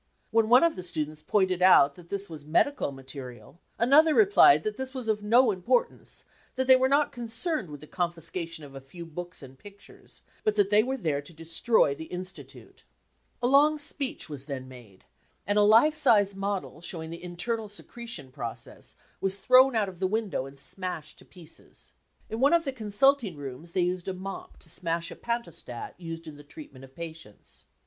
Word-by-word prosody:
When 225 -1 +2
one 250 +5 +7
of 335 -1 +3
the - - -6
students 155 -3 -4
pointed 185 +2 +1
out 160 -6 +6
that 170 +2 -16
this 200 0 -4
was 155 -3 -10
medical 165 - +1
material, 135 +1 -10 0.2
another 300 +6 +5
replied 395 - +6
that 215 -1 -2
this 265 +2 -6
was 255 -3 -5
of 215 -1 0
no 230 +3 +4
importance, 235 +6 -1 0.3
that 260 0 0
they 260 0 +8
were 260 0 +2
not 285 +1 +3
concerned 235 - -3
with 145 -1 -9
the - - -10
confiscation 170 -1 -4
of 140 -1 -12
a 135 - -9
few 170 +6 -10
books 175 0 -8
and 135 0 -13
pictures, 205 0 -17 0.2
but 215 - +1
that 205 -1 +2
they 210 +1 +6
were 260 +4 -2
there 150 - -1
to 145 +4 -14
destroy 165 +2 +1
the 160 +3 -8
Institute. 185 +3 -9 0.6
A - - +4
long* 290 +3 +5
speech 290 - -3
was 145 -4 -7
then 130 -3 -5
made, 120 -7 -15 0.4
and 205 +2 +2
a - - +5
life 225 +9 +5
sized 205 -9 +4
model 195 -4 -4
showing 165 -2 -5
the 170 +1 -9
internal 210 +5 -3
secretion 205 - -7
process 120 -4 -8 0.2
was 195 0 0
thrown 255 +4 +5
out 215 -2 +2
of 185 -3 -9
the 190 - +1
window 205 -9 -2
and 135 +1 -13
smashed 170 0 -5
to - - -16
pieces. 165 -3 -15 0.3
In 220 - -5
one 280 +5 +4
of 335 -1 +3
the 275 - -1
consulting 225 - +1
rooms 145 +4 -8
they 185 - +1
used 180 +1 -1
a 190 - -3
mop 195 +1 -8
to - - -11
smash 170 0 -2
a - - -8
pantostat 205 - -5
used 165 -1 -7
in 150 -2 -9
the 145 - -13
treatment 145 -3 -12
of 135 0 -15
patients. 160 -10 -10
185 Hz, 190 wpm, -27 LUFS, 155-230 Hz, 0.6 s, they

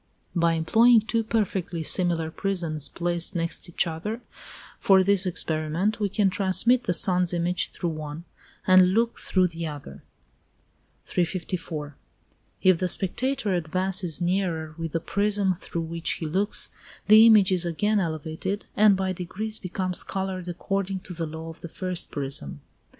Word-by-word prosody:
By 170 -1 +2
employing 225 +9 +4
two 225 +1 -1
perfectly 195 -6 -2
similar 165 -2 +2
prisms 165 -6 -2
placed 175 +1 -3
next 170 +1 -3
each 175 - 0
other, 175 +8 -5 0.6
for 190 -1 +5
this 195 0 +2
experiment, 165 +5 -2
we 205 -2 0
can 195 0 +1
transmit 230 +6 +2
the 180 - 0
sun's 180 -1 +2
image 175 0 -1
through 175 - -4
one, 155 +1 -7 0.4
and 185 0 +5
look 230 +1 0
through 185 -1 +1
the 165 0 -5
other. 145 - -9 1.0
354. 165 -4 -3 0.7
If 185 -3 +4
the 185 - -1
spectator 215 +4 0
advances 185 0 +4
nearer 175 -3 -1
with 165 -1 -6
the 165 - 0
prism 200 +2 0
through 170 -1 -6
which 165 0 -2
he 165 - -6
looks, 190 +7 +1 0.4
the 215 +1 +8
image 210 -4 +5
is 180 -2 +3
again 205 +5 0
elevated, 160 +3 -4
and 205 -1 +5
by 190 -1 -1
degrees 200 +5 -5
becomes 185 0 -3
coloured 190 -2 -4
according 195 +2 -3
to 180 - -9
the 165 -1 -4
law 160 +1 -8
of 165 - -12
the 170 - -8
first 185 0 -4
prism. 135 - -4
180 Hz, 150 wpm, -25 LUFS, 165-195 Hz, 1.0 s, the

